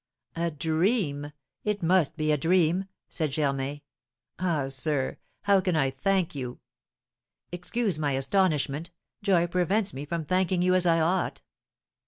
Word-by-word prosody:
"A 170 +1 0
dream! 160 - 0 0.3
It 210 -3 -1
must 165 -3 +3
be 155 -1 +1
a - - +4
dream!" 175 +4 +2 0.2
said 155 -3 -1
Germain. 140 0 -1 0.6
"Ah, 170 -6 0
sir, 135 0 -1 0.2
how 200 -1 +4
can 180 -2 0
I 135 -4 +2
thank 180 +6 0
you? 125 -4 -5 0.9
Excuse 180 +1 -1
my 145 -2 0
astonishment, 150 +1 +1 0.3
joy 190 -4 +3
prevents 185 +4 0
me 140 +2 -5
from 165 +1 -3
thanking 185 +1 +1
you 185 0 +3
as 185 -1 +3
I 165 -1 +4
ought." 175 +3 0
165 Hz, 140 wpm, -27 LUFS, 145-185 Hz, 0.9 s, a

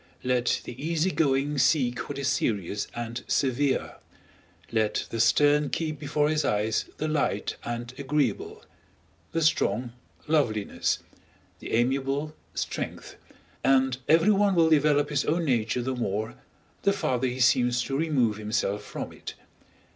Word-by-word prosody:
Let 125 -1 +1
the - - -7
easy 165 +3 +1
going 140 -2 +1
seek 125 -4 +2
what - - -4
is 140 -1 -2
serious 105 -7 -1
and 120 0 -5
severe; 135 +1 0 0.7
let 110 -2 0
the 115 - -3
stern 145 +5 +4
keep 155 -3 -3
before 145 0 0
his 155 0 +1
eyes 105 -2 0
the 155 - -2
light 155 -2 -1
and 120 +1 -5
agreeable; 150 - -1 0.7
the 165 0 0
strong, 120 -6 +1 0.3
loveliness; 120 -10 +1 0.6
the - - -7
amiable, 135 +5 0 0.2
strength; - - -4 0.5
and 130 -1 +3
everyone 195 +4 +4
will 165 -1 +4
develop 150 -1 +3
his 140 -1 +1
own 165 +2 +1
nature 120 -2 0
the 130 +1 -1
more, 110 -1 -2 0.5
the 200 - +3
farther 130 -9 0
he 125 +1 -4
seems 125 0 +3
to 135 - -3
remove 135 -8 +1
himself 105 -1 -1
from - - -6
it. - - -8
135 Hz, 135 wpm, -27 LUFS, 120-150 Hz, 0.7 s, stern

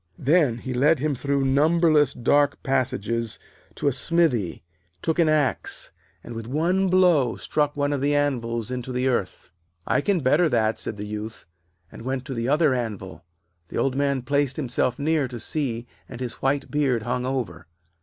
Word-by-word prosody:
Then 145 -4 +3
he 130 +2 -5
led 145 +6 +4
him 150 +2 -1
through 140 +1 0
numberless 150 +1 +3
dark 145 +4 +2
passages 115 -4 -1 0.4
to - - -2
a - - +4
smithy, 135 - +1 0.4
took 160 +1 0
an 165 -2 +4
axe, 150 -5 0 0.3
and 120 - -8
with 115 0 -6
one 175 +8 +1
blow 175 -10 +3
struck 150 -1 -1
one 145 0 +1
of 140 - -2
the 145 +1 +2
anvils 120 -5 -1
into 125 0 -4
the 125 +1 0
earth. 100 -7 -2 0.3
'I - - +2
can 190 +4 +1
better 150 +6 +3
that,' 110 -3 +1
said 105 - -4
the 105 - -5
Youth, 105 +1 -6 0.5
and - - -11
went 130 +1 -3
to 135 - -5
the 115 0 -2
other 150 -1 +3
anvil. 105 -8 -5 0.4
The - - -6
Old 135 -1 +1
Man 140 -2 0
placed 140 -1 0
himself 125 -3 0
near 150 -1 +1
to 120 -1 -7
see, 120 -4 -3 0.2
and 120 - -8
his 125 -2 -3
white 135 0 0
beard 135 -6 +1
hung 125 +2 -2
over. 130 - -3
135 Hz, 175 wpm, -24 LUFS, 120-145 Hz, 0.5 s, led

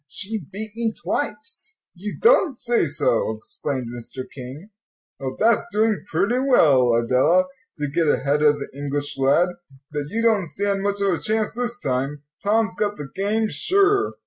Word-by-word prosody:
"She 210 +9 -3
beat 215 +2 -5
me 230 -1 -1
twice." 440 -1 -4 0.2
"You 200 +4 -6
don't 385 - +4
say 235 -8 +1
so," 115 -6 +1
exclaimed 130 +3 -4
Mr. 120 +2 -6
King. 140 - -9 0.5
"Well, 130 -1 -5
that's 225 0 +4
doing 215 0 +1
pretty 205 +10 +1
well, 140 - +4
Adela, 130 +10 +3 0.3
to 150 -1 -2
get 160 +3 0
ahead 145 0 +1
of 150 -1 +5
the - - -7
English 145 0 -3
lad. 140 +7 +4 0.4
But 145 -1 -3
you 230 +5 -1
don't 215 -6 +3
stand 200 +3 -1
much 200 0 -1
of 195 -2 +2
a 165 - -2
chance 215 0 0
this 240 +1 -3
time; 135 - -2 0.2
Tom's 210 -2 +1
got 205 -1 -1
the 145 -2 -7
game, 210 +3 0
sure." 400 - +2
195 Hz, 165 wpm, -23 LUFS, 145-220 Hz, 0.5 s, of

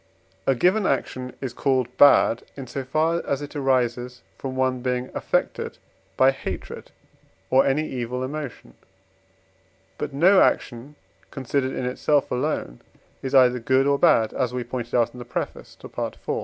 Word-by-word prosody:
A 135 - +4
given 185 - +2
action 130 -1 -2
is 130 -3 -4
called 130 -2 0
bad, 135 -4 +6 0.2
in 135 - -6
so 135 +2 -5
far 155 +5 0
as 140 +1 -2
it 145 - -9
arises 125 -2 0
from 130 -1 -6
one 130 -1 0
being 125 0 -2
affected - - -2 0.4
by 130 +1 +6
hatred 135 - -7 0.6
or 130 +1 +5
any 150 +3 +1
evil 125 0 -4
emotion. 145 -1 -6 1.3
But 150 - -3
no 180 +8 +5
action, 125 +5 0 0.3
considered 135 0 -2
in 130 - -3
itself 140 +3 +1
alone, - - -2 0.4
is 135 +1 -2
either 125 -1 +5
good 130 +3 +2
or 140 0 +2
bad 115 -10 +4
(as 125 -1 -1
we 125 - -2
pointed 120 0 -5
out 120 -1 +2
in 125 - -10
the - - -6
preface 120 - -5
to - - -11
Pt. - - -5
IV.) - - 0
130 Hz, 160 wpm, -24 LUFS, 125-140 Hz, 1.3 s, bad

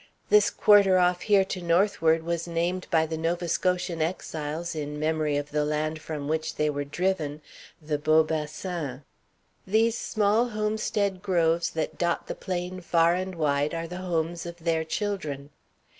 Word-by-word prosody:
This 425 0 +5
quarter 200 -3 +5
off 180 0 +2
here 200 -3 +4
to 185 -1 -5
northward 170 -2 +2
was 170 0 -2
named 175 +2 -1
by 160 -2 +3
the 160 0 -4
Nova 170 +2 -1
Scotian 180 -1 0
exiles, 160 -1 -3
in 150 -1 -4
memory 155 -1 0
of 145 0 -4
the 150 0 +1
land 155 +1 -2
from 150 -3 -5
which 160 +1 -2
they 150 0 +1
were 145 0 -3
driven, 150 -1 -2 0.4
the 150 -2 -2
Beau 155 +1 +4
Bassin. 155 -2 -4 0.6
These 220 +3 +3
small 220 +1 +1
homestead 210 -3 -1
groves 170 -3 +2
that 160 -1 -4
dot 170 -1 0
the - - -4
plain 185 0 -4
far 170 -1 +3
and 185 +1 -3
wide 145 -1 0
are 165 0 -3
the 180 +2 -7
homes 170 -2 -2
of 170 0 -8
their 165 -1 +1
children. 160 -6 -3
170 Hz, 160 wpm, -27 LUFS, 155-185 Hz, 0.6 s, This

